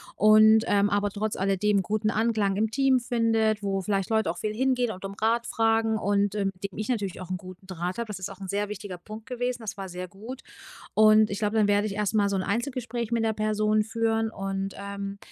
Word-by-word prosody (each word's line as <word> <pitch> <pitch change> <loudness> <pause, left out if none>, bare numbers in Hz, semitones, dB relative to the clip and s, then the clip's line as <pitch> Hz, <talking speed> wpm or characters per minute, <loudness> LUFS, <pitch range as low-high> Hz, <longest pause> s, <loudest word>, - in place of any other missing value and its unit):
und, 215 +1 +6
ähm, 205 0 +3
aber 205 0 +1
trotz 210 +2 -3
alledem 195 +2 +1
'n - - +1
guten 215 +3 -1
Anklang 215 -3 +1
im 215 +1 +1
Team 265 +1 +3
findet, 225 -3 +1
wo 195 -1 -1
vielleicht 195 +1 -1
Leute 220 -5 +2
auch 170 - -3
viel 210 +4 -3
hingehen 250 0 +1
und 195 0 -6
Rat 230 +1 +1
fragen 225 0 +2
und, 205 0 +1
ähm, 195 -2 0
mit 185 - -23
dem - - -13
ich 215 +2 -4
natürlich 205 -8 -2
auch 185 - -8
'n 185 - -1
guten 185 +1 -12
Draht 180 0 -4
habe. 235 - -2
Das 205 -2 -6
ist 185 - -4
auch 195 -1 -11
'n 190 - -6
sehr 205 +2 -1
wichtiger 200 -3 -6
Punkt 215 +4 -10
gewesen. 250 -1 -2
Das 220 - -5
war 195 -1 -6
sehr 180 +1 -6
gut. 225 +8 -9 0.5
Und 215 0 +6
ich 200 - -3
glaube, 215 0 -1
dann 215 -2 +4
werd 205 +1 +3
ich 200 -2 -3
erst 210 0 -1
mal 205 -2 +3
so 200 - -1
'n 185 - 0
Einzelgespräch 235 0 -3
mit 230 -1 +1
der 220 -1 +1
Person 215 0 +1
führen 225 0 0
und, 195 -1 -4
ähm, 200 0 -6
210 Hz, 235 wpm, -26 LUFS, 195-225 Hz, 0.5 s, und